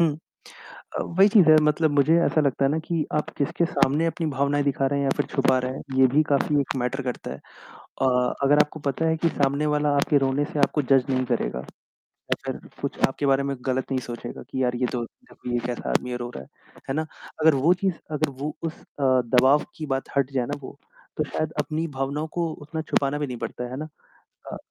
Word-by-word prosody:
हुँ। 165 -3 +4 0.9
अ, - - 0
वही 190 +4 +4
चीज़ 200 -6 +5
है 155 - +8
मतलब 150 +1 +2
मुझे 145 +3 +4
ऐसा 155 - +2
लगता 140 -2 +1
है 135 - +3
ना 155 - 0
कि 165 -3 0
आप 150 +1 -1
किसके 145 +4 +1
सामने 155 0 +2
अपनी 165 0 -2
भावनाएँ 140 +1 0
दिखा 135 -1 +1
रहे 140 +1 0
हैं - - 0
या - - +2
फिर - - 0
छुपा 135 -2 +3
रहे 125 0 -3
हैं, - - -7 0.2
ये 130 - +8
भी 145 +5 +3
काफ़ी 145 +1 +2
एक 140 - -2
मैटर 130 +2 -2
करता 125 - -4
है। 70 - -8
अ, 125 - -2
अगर 145 +2 +5
आपको 150 +1 +1
पता 145 +3 -1
है 160 0 +2
कि 165 - +2
सामने 140 0 0
वाला 150 0 +1
आपके 145 +1 +3
रोने 135 +1 +1
से 150 - -5
आपको 150 +1 +2
जज 135 -1 +4
नहीं 130 -1 +1
करेगा। 115 - -1 0.7
अगर - - -6 0.2
कुछ - - -3
आपके 135 +2 -3
बारे 135 0 +3
में 140 0 -2
गलत 130 0 -1
नहीं 130 - +1
सोचेगा 120 -1 -7
कि 130 - -1
यार 125 -1 +1
ये 125 +1 +1
तो 125 -2 -2
देखो, 250 - -11
ये 120 - +1
कैसा 125 -1 -4
आदमी 125 - 0
है 125 - -2
रो 120 0 -5
रहा - - -7
है, - - -23 0.4
है 135 - -1
ना? 155 - 0 0.4
अगर 155 -2 +6
वो 145 +6 +4
चीज़ 185 0 -1 0.2
अगर 150 -2 0
वो 150 +1 -3
उस 165 -1 -4
अ, 140 - -6 0.3
दबाव 135 +4 +5
की 155 - -5
बात 135 0 -2
हट 140 -1 +2
जाए 125 -3 0
ना 145 - -4
वो 135 - -9 0.4
तो 155 - 0
शायद 155 +1 -3
अपनी 160 +2 -2
भावनाओं 140 +3 -2
को 170 -1 0 0.2
उतना 160 +2 -5
छुपाना 140 +1 +1
भी 145 - -1
नहीं 125 - -5
पड़ता 125 - -5
है, 125 - -6
है 130 - -5
ना? 155 +3 -4 0.7
अ, - - -4
140 Hz, 235 wpm, -25 LUFS, 130-155 Hz, 0.9 s, है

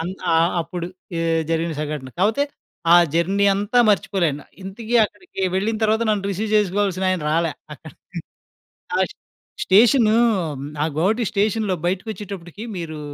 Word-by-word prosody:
అన్ 175 +3 -3 0.2
ఆహ్, 165 +2 +4
అప్పుడు 170 +1 -5 0.6
జరిగిన 165 0 0
సంఘటన. 150 -3 -4
కాకపోతే 220 +9 +2 0.5
ఆ - - +9 0.2
జర్నీ 195 +4 +2
అంతా 205 +5 0
మర్చిపోలేను. 170 -8 0 0.2
ఇంతకి 220 +5 -5
అక్కడికి 210 - -7
వెళ్ళిన 215 +4 0
తర్వాత 220 +1 +2
నన్ను 210 -2 0
రిసీవ్ 210 +3 -3
చేసుకోవాల్సిన 195 -2 +1
ఆయన 185 -4 -1
రాలా 165 0 +1 0.2
అక్కడ. - - -13 1.1
ఆ - - +2 0.7
స్టేషను 220 +3 +5 0.7
ఆ - - +2
గోహటి 215 +8 +2
స్టేషన్‌‌‌లో 210 -1 0
బయటకచ్చేటప్పటికి 195 0 -5
మీరు 160 -3 -5
195 Hz, 125 wpm, -21 LUFS, 170-215 Hz, 1.1 s, ఆ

